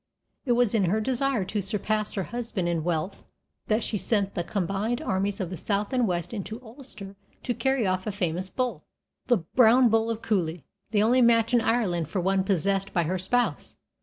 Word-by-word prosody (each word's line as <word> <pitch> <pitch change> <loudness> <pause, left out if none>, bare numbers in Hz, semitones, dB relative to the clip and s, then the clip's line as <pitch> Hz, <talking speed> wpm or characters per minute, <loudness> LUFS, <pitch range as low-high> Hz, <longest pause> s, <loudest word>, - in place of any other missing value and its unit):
It 245 - +4
was 240 -2 +2
in 210 -4 +3
her 200 +5 +1
desire 255 -2 0
to 205 +2 -2
surpass 210 +2 -1
her 195 - -2
husband 230 -5 -3
in 170 -2 -1
wealth 175 +3 -2 0.5
that 215 +1 +1
she 210 - -2
sent 200 -2 0
the 175 - -2
combined 200 +6 -1
armies 195 +1 -1
of 185 -2 -3
the 185 - -5
south 205 - -2
and 250 -3 +2
west 175 +2 -2
into 215 +1 -5
Ulster 220 -5 -10 0.3
to 245 - -1
carry 265 -2 0
off 185 +1 -1
a - - 0
famous 185 -2 -2
bull, 235 -7 -2 0.4
the 245 - +4
Brown 235 +7 +4
Bull 225 +1 +2
of 230 -1 -3
Cooley, 170 - -1 0.2
the 210 -1 +2
only 245 +4 +4
match 230 0 +4
in 240 - +5
Ireland 185 -9 0
for 185 - -2
one 190 +1 +1
possessed 195 +1 0
by 170 - +2
her 180 +3 -1
spouse. 245 +7 -1
205 Hz, 195 wpm, -26 LUFS, 185-230 Hz, 0.5 s, in